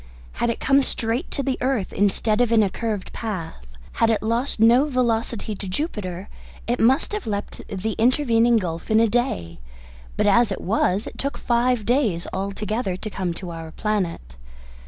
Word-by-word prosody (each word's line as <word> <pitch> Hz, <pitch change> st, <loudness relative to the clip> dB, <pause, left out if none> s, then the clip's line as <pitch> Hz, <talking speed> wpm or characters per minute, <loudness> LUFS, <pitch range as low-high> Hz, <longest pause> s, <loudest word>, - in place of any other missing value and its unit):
Had 235 Hz, -, -1 dB
it 230 Hz, -, -2 dB
come 275 Hz, +1 st, +4 dB
straight 235 Hz, -1 st, -1 dB
to 280 Hz, -, -2 dB
the 265 Hz, -1 st, -1 dB
earth 255 Hz, -6 st, 0 dB
instead 210 Hz, +2 st, +2 dB
of 240 Hz, -2 st, +2 dB
in 225 Hz, -2 st, +5 dB
a 195 Hz, -, 0 dB
curved 220 Hz, -4 st, -4 dB
path, 175 Hz, -, -5 dB, 0.2 s
had 230 Hz, -, +2 dB
it 220 Hz, -2 st, +1 dB
lost 230 Hz, +3 st, 0 dB
no 240 Hz, +6 st, +5 dB
velocity 230 Hz, -4 st, 0 dB
to 200 Hz, -1 st, -7 dB
Jupiter, 190 Hz, -, -4 dB, 0.4 s
it 240 Hz, +1 st, -1 dB
must 265 Hz, -, +3 dB
have 420 Hz, -, -4 dB
leapt 205 Hz, -1 st, -4 dB
the 200 Hz, +3 st, -2 dB
intervening 235 Hz, -1 st, +4 dB
gulf 170 Hz, -3 st, -4 dB
in 220 Hz, 0 st, +4 dB
a 230 Hz, -, +4 dB
day; 205 Hz, -, -1 dB, 0.6 s
but -, -, +2 dB
as 215 Hz, +1 st, +4 dB
it 190 Hz, -, -3 dB
was, 200 Hz, 0 st, +1 dB
it -, -, -9 dB
took 280 Hz, +1 st, -2 dB
five 240 Hz, -2 st, +1 dB
days 230 Hz, -9 st, +1 dB
altogether 200 Hz, +1 st, -2 dB
to 215 Hz, -, -5 dB
come 185 Hz, -2 st, -2 dB
by 170 Hz, 0 st, -6 dB
our 165 Hz, -1 st, -7 dB
planet. 175 Hz, -, -2 dB
220 Hz, 180 wpm, -23 LUFS, 195-240 Hz, 0.6 s, in